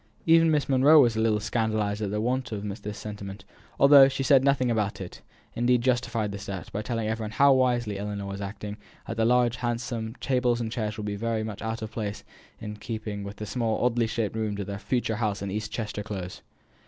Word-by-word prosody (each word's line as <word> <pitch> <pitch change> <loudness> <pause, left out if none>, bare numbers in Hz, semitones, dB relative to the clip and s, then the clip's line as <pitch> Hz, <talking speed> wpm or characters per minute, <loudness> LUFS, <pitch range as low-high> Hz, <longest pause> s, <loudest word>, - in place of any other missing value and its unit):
Even 165 0 +6
Miss 150 -2 +1
Monro 140 +4 +6
was 120 -5 +4
a - - -1
little 110 -1 +2
scandalized 110 -1 -1
at 105 - -1
this 105 +1 -2
want 125 +2 -1
of 105 -2 -4 0.2
sentiment, 100 -2 -8 0.3
although 140 -1 +9
she 135 0 -2
said 135 -1 +5
nothing 135 -3 +2
about 105 -2 -1
it; 95 -2 -8 0.3
indeed 120 0 +2
justified 120 -4 0
the 100 - -6
step, 100 -2 -6
by 105 - -3
telling 115 0 -2
every 110 0 -2
one - - -4
how 140 +5 +5
wisely 120 -6 +1
Ellinor 100 0 -4
was 100 0 -5
acting, 105 +1 -6 0.3
as 115 - -4
the 115 0 +1
large, 120 0 +3
handsome, 120 -1 -3
tables 125 -3 +1
and 115 -2 -3
chairs 110 -3 -3
would 105 - -5
be 105 -1 -2
very 110 +1 -1
much 110 -2 -6
out 110 0 -3
of 110 - -6
place 105 -3 -4 0.4
and 105 -1 -7
keeping 110 -3 -5
with 100 +1 -7
the 110 - -6
small, 115 +1 -1
oddly 120 -2 +2
shaped 110 -1 -2
rooms 105 -2 -2
of 100 - -3
their 100 +1 -5
future 110 +1 -1
home 105 -3 0
in 100 -1 -3
East 105 +1 -4
Chester 105 -2 -4
Close. 95 -4 -6
110 Hz, 215 wpm, -27 LUFS, 105-120 Hz, 0.4 s, although